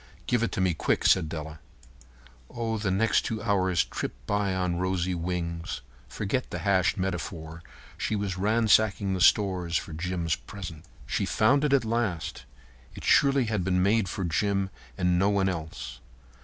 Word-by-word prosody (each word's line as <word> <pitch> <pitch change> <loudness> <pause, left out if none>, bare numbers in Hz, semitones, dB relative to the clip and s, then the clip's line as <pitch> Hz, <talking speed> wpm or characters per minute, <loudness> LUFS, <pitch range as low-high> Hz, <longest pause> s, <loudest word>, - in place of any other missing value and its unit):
"Give 120 -2 +1
it 115 - 0
to - - -1
me 95 -2 +2
quick," - - 0
said 80 - +4
Della. 80 -1 -6 0.9
Oh, 115 -1 -3
and 110 - -2
the 100 - 0
next 105 +4 +3
two 110 - -3
hours 95 -6 +2
tripped - - -6
by 100 +3 0
on 90 -2 0
rosy 90 0 0
wings. 85 -1 -3 0.3
Forget 110 +5 -2
the - - -4
hashed 95 -4 +3
metaphor. 85 -3 -4 0.4
She 110 - -1
was 100 -3 -2
ransacking 105 -1 +3
the 95 - -2
stores 90 -5 +3
for 80 - -6
Jim's 85 0 -1
present. 85 -6 -9 0.2
She - - -1
found 140 +7 +3
it 150 - +2
at 140 -4 +3
last. 105 - -2 0.5
It - - -9
surely 140 -2 +4
had 105 -4 -1
been 90 0 +2
made 100 -1 +2
for 95 - -3
Jim 95 +3 0 0.3
and 90 0 +2
no 100 +2 +3
one 100 -1 +2
else. 80 -9 -5
95 Hz, 170 wpm, -27 LUFS, 85-105 Hz, 0.9 s, said